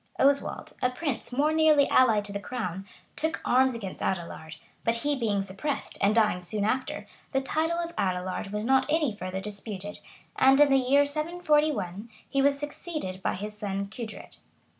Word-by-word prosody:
Oswald, 280 +1 +1
a 250 - +3
prince 255 -1 -3
more 290 +5 +2
nearly 310 -3 +5
allied 220 -5 +4
to 200 - -5
the 200 - -2
crown, 195 -5 -4 0.3
took 320 +1 -1
arms 260 0 +4
against 195 -5 -6
Adelard; 170 -3 -3 0.3
but 230 - +2
he 290 0 +2
being 210 -6 0
suppressed, 200 +10 -4
and 205 +2 +3
dying 210 -5 +3
soon 200 +4 -2
after, 255 +4 -1 0.3
the 270 - +3
title 320 +5 0
of 340 0 -3
Adelard 185 +1 -1
was 210 +1 -2
not 265 +1 +3
any 300 -8 +1
further 185 0 -4
disputed; 205 0 -6 0.4
and 270 +1 +6
in 295 -1 +6
the 270 - +6
year 275 +3 +4
741, 300 - 0 0.2
he 275 - +1
was 280 0 +3
succeeded 295 - -5
by - - 0
his 210 +3 -5
cousin 200 -2 -3
Cudred. 220 0 -8
240 Hz, 170 wpm, -28 LUFS, 200-285 Hz, 0.4 s, and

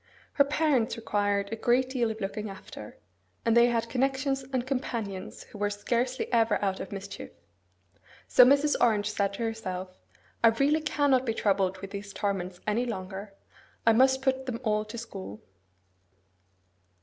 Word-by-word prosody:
Her 280 - +5
parents 280 -5 +1
required 205 -2 0
a - - -1
great 245 +3 +2
deal 240 -4 +1
of 220 0 -5
looking 210 +2 -4
after, 150 - -10 0.5
and 230 0 +3
they 235 0 +7
had 235 -1 0
connections 270 +2 0
and 255 -2 -1
companions 230 -7 -4
who 205 - -13
were 205 0 +1
scarcely 240 +5 -1
ever 225 -2 +3
out 190 -1 -1
of 190 - -7
mischief. 200 0 -7 1.0
So 250 - +7
Mrs. 280 +3 +4
Orange 215 -3 +3
said 200 -1 0
to 215 - -4
herself, 185 -5 -4 0.4
'I - - +8
really 275 +7 +3
cannot 285 -4 +2
be 225 -3 -2
troubled 190 -3 +1
with 195 -1 -7
these 200 0 -7
torments 185 -3 -3
any 230 +4 0
longer: 195 -1 -6 0.5
I 225 - +6
must 265 +3 +4
put 265 0 0
them 235 -2 -3
all 215 -2 +1
to 215 +2 -8
school. 105 - -7
225 Hz, 160 wpm, -28 LUFS, 200-255 Hz, 1.0 s, I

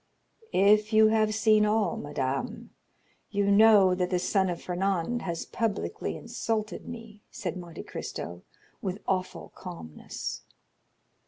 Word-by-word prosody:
"If 210 +3 +4
you 215 0 +7
have 215 -1 +2
seen 215 -1 +4
all, 210 0 +2
madame, 145 - -3 0.6
you 200 0 +1
know 205 -3 +7
that 180 -1 0
the 180 - +1
son 190 +1 +1
of 175 - -3
Fernand 190 +4 -1
has 170 -3 -3
publicly 225 -4 -2
insulted 215 -2 -3
me," 225 -3 -9
said 180 -3 -4
Monte 175 -3 -8
Cristo 85 0 -6 0.4
with 190 +1 -4
awful 185 -1 -2
calmness. 170 - -7
200 Hz, 120 wpm, -28 LUFS, 180-215 Hz, 0.6 s, you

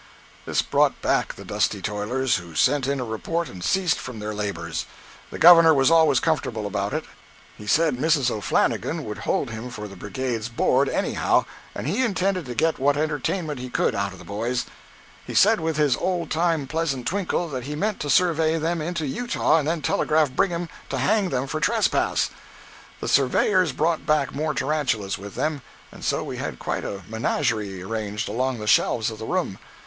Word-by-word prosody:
This - - +1
brought - - +2
back - - +1
the - - -11
dusty - - 0
toilers, 110 +5 -1
who 85 -2 -10
sent 135 - +2
in 140 0 0
a 125 - -2
report 165 +10 -2
and 90 -2 -9
ceased 185 - +1
from 125 -2 -7
their 105 0 -4
labors. 85 -6 -4 0.4
The - - -7
Governor 165 -2 +8
was 135 +2 +4
always 160 -6 +5
comfortable 125 -9 -1
about 100 0 -2
it; - - -2 0.5
he 105 - -11
said 155 +1 +3
Mrs. 140 -3 +2
O'Flannigan 105 -3 0
would - - -6
hold - - 0
him 110 +3 -6
for 105 -4 -7
the 100 - -11
Brigade's 115 +3 -3
board 130 +3 +2
anyhow, - - +1 0.3
and - - -5
he 200 - +1
intended 190 - 0
to 120 - -5
get 160 +5 +1
what 140 +2 +2
entertainment 150 0 -2
he 125 0 -6
could - - +1
out 100 0 -1
of 95 - -11
the - - -13
boys; 115 +5 -2 0.6
he - - -7
said, 215 +1 +5
with 160 -1 -2
his 150 -4 +3
old 175 -4 -2
time 165 -2 +1
pleasant 140 -4 -2
twinkle, 180 -1 -1
that 130 -4 -5
he 150 +1 -4
meant 205 +5 -1
to 145 - -3
survey 165 -1 +3
them 165 +1 -1
into 170 0 -2
Utah 200 - +1
and 150 - -2
then 160 -2 -1
telegraph 155 -3 +2
Brigham 175 +3 0 0.2
to 135 - -2
hang 195 +8 +2
them 130 -1 -1
for 155 +3 -3
trespass! - - +1 0.7
The - - -3
surveyors 165 +6 +3
brought 160 +1 0
back 150 -3 +2
more 150 +1 -2
tarantulas 135 -10 -1
with 100 0 -9
them, 155 -3 -1 0.3
and - - -12
so - - 0
we - - -6
had - - -4
quite - - -3
a 100 -2 -5
menagerie 110 -3 -1
arranged 105 0 -3
along 125 +4 -1
the 105 - -6
shelves 110 +1 +3
of 110 - -9
the 110 - -6
room. 175 - -1
140 Hz, 190 wpm, -24 LUFS, 110-165 Hz, 0.7 s, Governor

